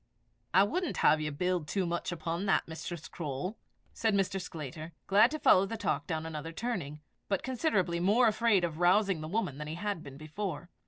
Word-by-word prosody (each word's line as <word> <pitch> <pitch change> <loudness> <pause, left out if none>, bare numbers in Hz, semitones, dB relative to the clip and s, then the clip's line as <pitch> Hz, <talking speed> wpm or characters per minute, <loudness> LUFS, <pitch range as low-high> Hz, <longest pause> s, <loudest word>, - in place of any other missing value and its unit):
"I 190 +3 +6
wouldn't 355 - -1
have 155 +1 +5
you 150 0 -2
build 180 +1 -1
too 190 +2 0
much 175 +1 -2
upon 170 +3 -3
that, - - +2
Mistress 165 +1 -6
Croale," 155 +5 -4 0.4
said 220 -2 +1
Mr. 195 -1 0
Sclater, 155 0 -7
glad 210 +4 +5
to 310 - -3
follow 195 -9 +5
the 225 - -4
talk - - -1
down 160 -3 -2
another 160 0 -5
turning, 165 - -4 0.3
but 195 -2 0
considerably 210 - 0
more 210 +7 +4
afraid 215 -3 +3
of 165 -2 -2
rousing 185 -1 +3
the 155 - -5
woman 160 -7 -2
than 150 - -5
he 155 - -4
had 200 -1 -3
been 135 -2 -10
before. 155 +2 -5
175 Hz, 195 wpm, -31 LUFS, 155-205 Hz, 0.4 s, I